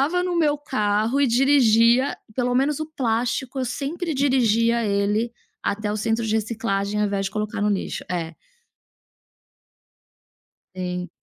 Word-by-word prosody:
colocava 340 +6 +1
no 360 -1 -1
meu 295 -3 +2
carro 220 -2 0
e 285 - +4
dirigia, 245 -1 +4 0.2
pelo 245 0 0
menos 275 +3 +1
o 310 - -2
plástico, 250 -2 -2
eu - - 0
sempre 300 +7 -3
dirigia 235 -4 +2
ele 205 +3 0 0.3
até 210 0 -2
o - - -2
centro 225 +2 -1
de 215 - 0
reciclagem, 210 -2 -1
ao 210 - +2
invés 200 -1 -1
de - - -4
colocar 210 -1 -3
no 210 - +2
Lixo, 200 -2 -2
é. 170 -2 -3 2.4
Sim. 180 -1 -4
230 Hz, 145 wpm, -23 LUFS, 210-270 Hz, 2.4 s, e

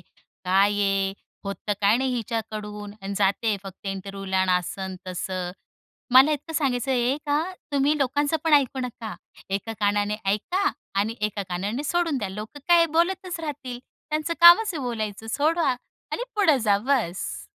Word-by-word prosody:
"काय 195 +2 0
आहे? 195 -1 +1 0.3
होतं 200 +1 -3
काय 205 +2 +4
नाही 260 0 0
हिच्याकडून 215 -3 -4
आणि 195 +1 -4
जाते 205 +2 +2
फक्त 195 +1 -10
इंटरव्ह्यूला" 195 0 -3
आणि 185 -1 +2
असं 180 +2 -6
अन् 190 -1 -6
तसं. 185 0 -3 0.6
मला 265 +4 +8
इतकं 300 +2 -4
सांगायचं 270 -4 0
आहे 250 +1 +2
का 290 +1 +2 0.3
तुम्ही 285 +2 +3
लोकांच 285 +3 +1
पण 320 - +2
ऐकू 270 -2 +3
नका. 240 -3 -5 0.4
एका 200 +3 -2
कानाने 205 0 +1
ऐका 350 - +1 0.3
आणि 220 +3 -1
एका 210 -1 -1
कानाने 200 +9 -2
सोडून 330 -2 +1
द्या. 205 - -3
लोक 210 +7 -8
काय 340 -1 +6
बोलतच 365 0 0
राहतील. 275 -6 -5 0.3
त्यांचं 310 +2 -1
कामच 345 +6 +9
आहे 290 - -3
बोलायचं. 220 -3 -4
सोडा 310 +1 +2 0.4
आणि 485 - -2
पुढे 320 -9 +4
जा, 210 -4 +3
बस. 220 -7 -1
225 Hz, 155 wpm, -25 LUFS, 200-290 Hz, 0.6 s, कामच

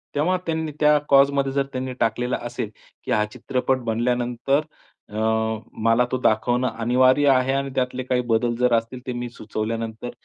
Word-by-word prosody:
तेव्हा 175 +6 +2
त्यांनी 160 -1 -2
त्या 150 0 +5
क्लॉजमध्ये 140 0 +4
जर 140 0 +1
त्यांनी 130 0 -3
टाकलेलं 120 +3 0
असेल, 120 -2 -4 0.3
की - - -5
हा 105 0 +3
चित्रपट 130 +1 -1
बनल्यानंतर 120 +4 0 0.5
अ, 105 - -11 0.7
मला 115 +2 +4
तो 130 - +1
दाखवणं 120 +3 +2
अनिवार्य 130 +4 +4
आहे 130 0 +3
आणि 135 0 -1
त्यातले 125 0 -1
काही 125 0 0
बदल 120 +1 +1
जर 125 -1 +3
असतील, 115 +2 0
ते 125 - -2
मी 120 0 -4
सुचवल्यानंतर 115 +1 -4
125 Hz, 160 wpm, -23 LUFS, 115-135 Hz, 0.7 s, त्या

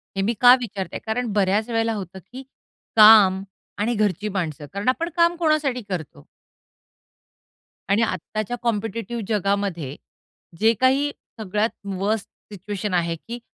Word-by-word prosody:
हे 195 - 0
मी 215 +4 +1
का 245 0 +9
विचारतेय? 195 -7 -5
कारण 225 0 -2
बऱ्याच 205 +3 +1
वेळेला 225 -1 0
होतं 190 -2 -7
की, 260 +2 -8 0.5
काम 210 -3 +7 0.4
आणि 235 +3 +1
घरची 210 -1 0
माणसं. 160 -7 -4
कारण 200 +5 -1
आपण 335 +6 -1
काम 340 0 +4
कोणासाठी 305 -6 +1
करतो? 160 - -6 1.6
आणि 200 +3 +3
आत्ताच्या 215 +4 -3
कॉम्पिटिटिव 230 +1 -2
जगामध्ये, 195 - -1 0.6
जे 225 +2 +4
काही 275 +3 +3 0.3
सगळ्यात 210 +1 0 0.3
वर्स्ट 205 +2 -1 0.3
सिच्युएशन 205 0 -5
आहे 170 -1 0
की, 235 +9 -8
210 Hz, 130 wpm, -23 LUFS, 190-235 Hz, 1.6 s, का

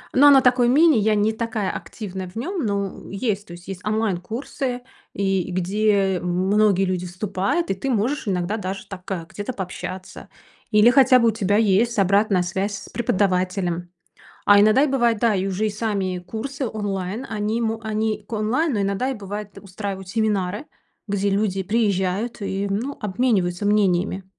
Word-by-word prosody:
Но 285 +3 +7
она 275 -2 +8
такой 250 -1 +4
мини. 305 0 +5
Я 215 0 +2
не 210 +1 +2
такая 220 -3 -2
активная 190 -4 -6
в 180 - -19
нём, 340 - -3
ну, 200 -2 -3
есть, 205 0 -2
то 175 - -10
есть 175 +1 -12
есть 190 -2 -7
онлайн 215 -3 0
курсы, 250 +3 -4 0.3
и 195 -2 0
где 195 +1 +1
многие 190 +2 +2
люди 185 -1 -2
вступают, 195 - -1
и - - +3
ты 230 +8 -4
можешь 245 +3 0
иногда 190 +2 -1
даже 195 -1 -5
так 190 0 -9 0.2
где-то 205 +5 -5
пообщаться. 185 -1 -7 0.4
Или 215 +3 +6
хотя 255 -1 +6
бы 235 - +4
у - - +2
тебя 205 -2 +1
есть 225 +2 +2
обратная 200 -1 +3
связь 195 +3 -2
с 195 - -11
преподавателем. 185 -5 0 0.6
А 205 0 +7
иногда 215 +6 +5
и - - +4
бывает, 240 -5 +2
да, 225 -1 +2
и 190 0 0
уже 195 +3 -1
и 215 - 0
сами 200 -4 -2
курсы 230 +9 -5
онлайн, 205 +1 -3
они 215 +2 -1
мо 225 0 -1
они 215 -1 -2
к - - -18
онлайн, 235 +8 0
но 205 - 0
иногда 200 +7 -1
и, - - -2
бывает, 205 -1 -7
устраивают 195 -1 -6
семинары, 210 +2 -1 0.4
где 200 0 0
люди 195 -1 0
приезжают 205 +1 0
и, 195 0 -2
ну, 230 +8 -3
обмениваются 200 -4 0
мнениями. 190 -2 +1
205 Hz, 170 wpm, -22 LUFS, 190-225 Hz, 0.6 s, она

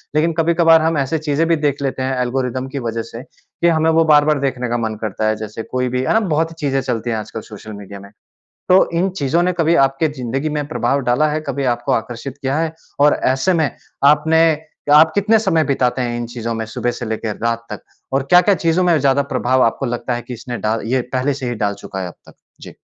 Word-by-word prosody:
लेकिन 165 +2 +2
कभी-कभार 165 0 +4
हम 160 0 +1
ऐसे 140 +3 0
चीज़ें 155 +1 0
भी 165 - +3
देख 145 -2 -1
लेते 130 -1 -2
हैं 130 0 -1
ऐल्गोरिदम 130 +1 -2
की 140 - -1
वज़ह 115 -1 -3
से 115 +3 -8
कि 170 +3 -5
हमें 160 -1 +3
वो 165 0 +4
बार-बार 150 -1 +4
देखने 130 -3 -2
का 120 - 0
मन 110 -2 -2
करता 110 0 -2
है। 110 - +1
जैसे 110 +1 -7
कोई 125 0 -2
भी, 125 +1 -1
है 130 - +1
ना? 225 - +4
बहुत 165 -5 0
ही - - -12
चीज़ें 135 -2 0
चलती 120 -2 -3
हैं 115 - -1
आजकल 110 +1 -6
सोशल 110 0 -11
मीडिया 100 0 -9
में। 100 0 -13 0.6
तो 185 +1 +5
इन 190 - +2
चीज़ों 155 +4 +1
ने 180 - +1
कभी 165 0 +3
आपके 135 +4 -1
ज़िन्दगी 135 +3 -3
में 145 - -3
प्रभाव 140 -2 0
डाला 125 +5 +2
है 155 +1 -1
कभी 140 - -2
आपको 120 - -3
आकर्षित 120 +4 -4
किया 135 +3 0
है? 160 -1 -1 0.3
और 145 +1 +5
ऐसे 135 +8 +2
में 160 -4 +1 0.3
आपने 160 +3 +5 0.4
क्या 145 - +7
आप 160 +1 +7
कितने 210 +2 +3
समय 175 -7 +1
बिताते 130 -3 0
हैं 120 -1 -2
इन 120 0 -4
चीज़ों 115 -1 -5
में 110 - -3
सुबह 120 +2 -2
से 120 -1 -6
लेकर 110 -1 -3
रात 115 0 -1
तक, - - -6 0.3
और 135 0 +1
क्या-क्या 180 +3 +6
चीज़ों 165 +2 +1
में 170 -3 +3
ज़्यादा 140 0 +3
प्रभाव 130 +1 +2
आपको 115 - +1
लगता 120 +1 -2
है 120 - -4
कि 125 - -7
इसने 120 +1 -6
डाल 110 +1 -1
ये 130 +2 +1
पहले 130 +2 0
से 130 -2 -4
ही 120 - -2
डाल 105 -2 -1
चूका 95 - -6
है 90 - -3
अब 85 - -12
तक? - - -16 0.3
जी। - - -11
135 Hz, 240 wpm, -18 LUFS, 120-160 Hz, 0.6 s, क्या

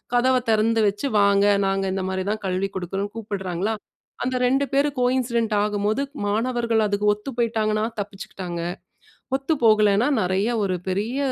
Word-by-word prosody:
கதவ 255 +2 +4 0.2
தெறந்து 225 +1 +2
வச்சு 205 +8 -1
வாங்க, 200 0 +4 0.2
நாங்க 195 0 0
இந்த 190 -1 -2
மாரிதான் 195 +3 -2
கல்வி 185 +1 -1
குடுக்றோம்னு 195 +3 -3
கூப்பிடுறாங்களா, 200 -1 -3 0.5
அந்த 255 0 -1
2 270 +3 +2
பேரும் 280 0 +1
கோயின்சிடென்ட் 240 -3 +1
ஆகும்போது, 210 +4 0 0.3
மாணவர்கள் 230 0 +1
அதுக்கு 205 +1 +2
ஒத்து 210 +7 -7
போயிட்டாங்கன்னா 220 -2 +1 0.2
தப்பிச்சுக்கிட்டாங்க. 195 -4 -6 0.8
ஒத்து 275 +4 -1
போகலன்னா 215 +2 +4
நறைய 190 +4 +1 0.2
ஒரு 185 -2 -1
பெரிய 210 +8 -1
215 Hz, 135 wpm, -23 LUFS, 195-235 Hz, 0.8 s, கதவ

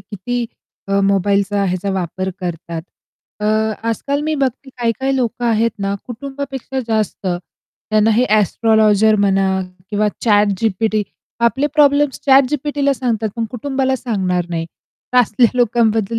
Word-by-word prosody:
किती 225 +5 -4 0.4
अ, 195 0 +2
मोबाईलचा 200 +1 +1
ह्याचा 185 +1 -1
वापर 185 0 -3
करतात. 170 -2 -5 0.6
अ, 210 - -2 0.4
आजकाल 280 +6 -1
मी 310 +1 -1
बघते 270 -1 -2
काही-काही 245 +3 0
लोकं 245 -1 -1
आहेत 230 0 +2
ना 195 0 -1
कुटुंबापेक्षा 270 +1 -5
जास्त 215 -3 -1
त्यांना 210 +4 -2
हे 235 +3 +3
एस्ट्रोलॉजर 215 +1 +3
म्हणा 195 -1 +2 0.4
किंवा 210 0 +1 0.2
ChatGPT. 210 0 +2 0.4
आपले 270 +5 +1
प्रॉब्लेम्स 290 -1 +3
ChatGPTला 280 +1 +3
सांगतात 230 -4 -1
पण 230 - -1
कुटुंबाला 265 +1 -1
सांगणार 190 -8 -1
नाही. 165 -1 -2 0.5
तर 250 - +5
असल्या 235 0 +3
लोकांबद्दल 225 -2 +2
225 Hz, 120 wpm, -18 LUFS, 200-260 Hz, 0.6 s, तर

